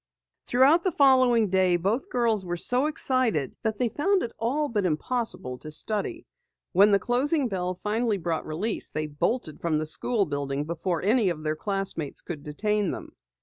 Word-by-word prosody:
Throughout 275 +8 +4
the 370 - +1
following 255 -7 +4
day, 185 -2 +3
both 220 - -1
girls 230 - +1
were 175 -1 -3
so 250 - +2
excited 255 - 0
that 220 -2 -2
they 245 +1 +1
found 380 - +1
it 235 - -4
all 280 +7 0
but 215 -6 -1
impossible 175 - -2
to 155 - -9
study. 215 - -1 0.5
When 200 +3 +5
the 200 - +5
closing 260 - +1
bell 180 -2 -3
finally 220 0 0
brought 170 -3 -3
release, 195 +8 -2
they 155 0 -3
bolted 155 - -2
from 165 -2 0
the 155 - -2
school 205 +7 +1
building 145 -2 -3
before 170 +2 -3
any 215 0 +3
of 155 -3 -4
their 155 0 -1
classmates 195 -5 -3
could 160 -4 -7
detain 205 +7 -1
them. - - -6
205 Hz, 175 wpm, -26 LUFS, 165-245 Hz, 0.5 s, When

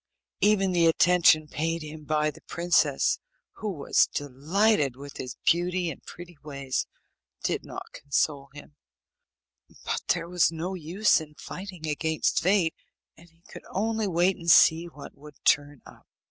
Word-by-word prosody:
Even 195 -2 +3
the 170 -2 +3
attention 165 -2 +4
paid 165 +3 -2
him 155 0 -9
by 155 0 +1
the - - -17
princess, 175 0 +1 0.4
who 215 -1 -3
was 150 -6 +2
delighted 145 - 0
with 140 +1 -10
his 125 -2 -6
beauty 175 0 +1
and - - -11
pretty 175 -3 -12
ways, 140 -3 -3 0.6
did - - -1
not - - -8
console 140 0 -1
him, 145 +1 -13 1.1
but - - -2
there 170 -1 0
was 175 -1 +2
no 165 +3 -4
use 180 +3 +1
in 150 -1 -12
fighting 185 -2 -8
against 160 +1 0
fate, 180 -3 +2 0.4
and 170 +1 -19
he 165 +1 -32
could - - -11
only 220 +2 -1
wait 180 +1 +2
and 170 0 -5
see 165 0 +6
what 150 -4 -11
would 150 +1 -14
turn 145 -1 +2
up. - - -17
165 Hz, 150 wpm, -26 LUFS, 150-180 Hz, 1.1 s, see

